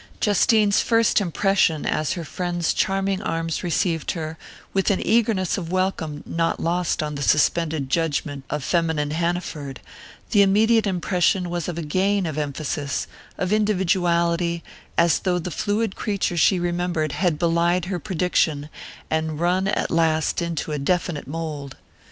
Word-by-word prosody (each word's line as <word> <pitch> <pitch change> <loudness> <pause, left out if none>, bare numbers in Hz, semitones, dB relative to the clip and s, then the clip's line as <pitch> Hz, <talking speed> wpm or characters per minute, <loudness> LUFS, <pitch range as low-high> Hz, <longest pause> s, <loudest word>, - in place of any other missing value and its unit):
Justine's 210 0 +3
first 230 -2 +3
impression, 190 -3 +1
as 155 +2 0
her 175 -3 -5
friend's 175 +1 -1
charming 195 0 0
arms 165 0 -2
received 170 -2 0
her 160 -2 -5 0.4
with 195 -1 +2
an 200 - +2
eagerness 215 -5 +2
of 170 -2 -6
welcome 185 -5 -1
not 165 0 -1
lost 170 -1 0
on 150 0 -3
the 140 - -5
suspended 150 0 +2
judgment 145 -2 -1
of 150 -1 -3
feminine 160 -3 0
Hanaford 160 -4 -3 0.5
the 205 - +5
immediate 215 +3 +4
impression 180 -1 +1
was 175 -3 -2
of 175 -2 -4
a 170 - -3
gain 190 +5 +1
of 155 -2 -3
emphasis, 145 0 -2 0.3
of 185 +2 0
individuality, 175 -4 +1 0.3
as 170 -3 +4
though 180 -2 0
the 180 +1 -4
fluid 205 +4 -1
creature 200 -5 -1
she 175 +3 +4
remembered 175 -3 -1
had 165 +1 0
belied 170 +1 +2
her 180 -1 -3
prediction, 160 -5 0 0.4
and 160 -1 -1
run 180 +3 +1
at 210 - -1
last 160 0 +1
into 170 -2 -3
a 150 - -2
definite 170 0 -1
mould. 150 -3 -5
170 Hz, 145 wpm, -23 LUFS, 155-190 Hz, 0.5 s, the